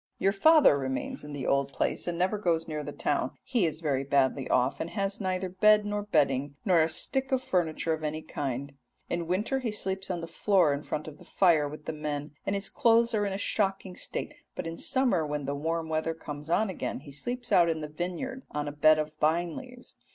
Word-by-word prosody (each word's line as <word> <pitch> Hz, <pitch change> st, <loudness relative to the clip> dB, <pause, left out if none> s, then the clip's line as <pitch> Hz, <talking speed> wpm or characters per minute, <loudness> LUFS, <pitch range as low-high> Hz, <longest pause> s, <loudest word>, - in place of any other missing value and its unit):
Your 195 Hz, -, +2 dB
father 290 Hz, -, +6 dB
remains 130 Hz, -1 st, -3 dB
in 150 Hz, -, -8 dB
the 140 Hz, -3 st, -4 dB
old 140 Hz, 0 st, +1 dB
place, -, -, -1 dB
and 175 Hz, -1 st, -2 dB
never 190 Hz, +4 st, +1 dB
goes 165 Hz, -4 st, 0 dB
near 155 Hz, -2 st, -3 dB
the 145 Hz, -, -5 dB
town; 145 Hz, -3 st, -1 dB
he 235 Hz, -9 st, +1 dB
is 155 Hz, 0 st, -5 dB
very 140 Hz, -4 st, 0 dB
badly 135 Hz, -1 st, +1 dB
off, 125 Hz, +2 st, +2 dB
and 165 Hz, -, -3 dB
has 200 Hz, +1 st, -2 dB
neither 185 Hz, -1 st, -1 dB
bed 210 Hz, +3 st, +4 dB
nor 205 Hz, 0 st, -1 dB
bedding, 145 Hz, -7 st, +1 dB
nor 180 Hz, -5 st, +5 dB
a 160 Hz, -, +2 dB
stick 265 Hz, -, -2 dB
of 260 Hz, -1 st, +1 dB
furniture 165 Hz, -6 st, 0 dB
of 160 Hz, 0 st, -5 dB
any 155 Hz, +1 st, -3 dB
kind. 140 Hz, 0 st, -4 dB, 0.4 s
In 170 Hz, -1 st, -1 dB
winter 210 Hz, +9 st, 0 dB
he 250 Hz, -3 st, -2 dB
sleeps 195 Hz, -2 st, -2 dB
on 180 Hz, -2 st, -1 dB
the 165 Hz, -, -5 dB
floor 170 Hz, -2 st, +2 dB
in 140 Hz, -, -3 dB
front 150 Hz, 0 st, -4 dB
of 150 Hz, -, -9 dB
the -, -, -13 dB
fire 165 Hz, -6 st, +3 dB
with 150 Hz, +1 st, -10 dB
the 160 Hz, -, -3 dB
men, 150 Hz, -1 st, -4 dB, 0.2 s
and 195 Hz, -, +1 dB
his 200 Hz, 0 st, -1 dB
clothes 230 Hz, 0 st, +3 dB
are 205 Hz, -2 st, +1 dB
in 195 Hz, -, -3 dB
a -, -, -2 dB
shocking 195 Hz, -2 st, -1 dB
state, -, -, -4 dB, 0.2 s
but -, -, -4 dB
in 165 Hz, 0 st, -4 dB
summer, 245 Hz, -6 st, +2 dB
when 150 Hz, -1 st, -3 dB
the 140 Hz, -, -2 dB
warm 160 Hz, +3 st, -2 dB
weather 160 Hz, +1 st, -1 dB
comes 150 Hz, -1 st, -8 dB
on 200 Hz, +4 st, +2 dB
again, 170 Hz, -, -4 dB
he 145 Hz, 0 st, -11 dB
sleeps 245 Hz, -, -5 dB
out 170 Hz, -1 st, +5 dB
in 160 Hz, -1 st, -1 dB
the 150 Hz, -, -4 dB
vineyard 180 Hz, -, -4 dB
on 150 Hz, 0 st, -3 dB
a -, -, -2 dB
bed 155 Hz, +2 st, +5 dB
of 155 Hz, 0 st, -2 dB
vine 165 Hz, +2 st, +2 dB
leaves. 250 Hz, -1 st, -11 dB
165 Hz, 230 wpm, -29 LUFS, 150-195 Hz, 0.4 s, father